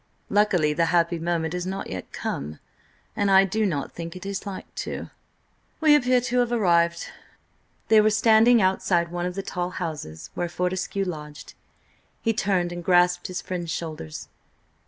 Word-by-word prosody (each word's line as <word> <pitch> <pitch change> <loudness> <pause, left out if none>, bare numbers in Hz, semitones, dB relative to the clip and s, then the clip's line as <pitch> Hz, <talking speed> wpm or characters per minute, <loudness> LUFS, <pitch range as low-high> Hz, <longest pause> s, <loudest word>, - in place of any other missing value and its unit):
Luckily, 180 -8 +3
the 165 +2 +2
happy 170 0 +2
moment 165 -1 -1
has 180 0 -3
not 195 +1 -4
yet 95 -1 -7
come–and 75 - -5
I 195 0 +6
do 215 +3 0
not 145 -7 -3
think 170 0 -7
it 185 - -9
is 200 +1 -4
like 195 -2 -7
to. - - -6 0.7
We 310 -2 +5
appear 255 -3 +3
to 250 +1 0
have 240 -1 +1
arrived." 170 -7 +2 0.8
They 220 -1 +6
were 215 - +4
standing 220 +1 +5
outside 175 -2 +1
one 175 0 -2
of 180 - -5
the 195 - -3
tall 180 -1 -3
houses 140 - -6
where 175 - -2
Fortescue 185 +2 -2
lodged. 150 -4 -7 0.7
He 225 - 0
turned 190 -4 0
and 175 0 -6
grasped 180 0 +3
his 180 -1 -5
friend's 175 -2 -4
shoulders. 155 - -5
180 Hz, 160 wpm, -25 LUFS, 170-200 Hz, 0.8 s, I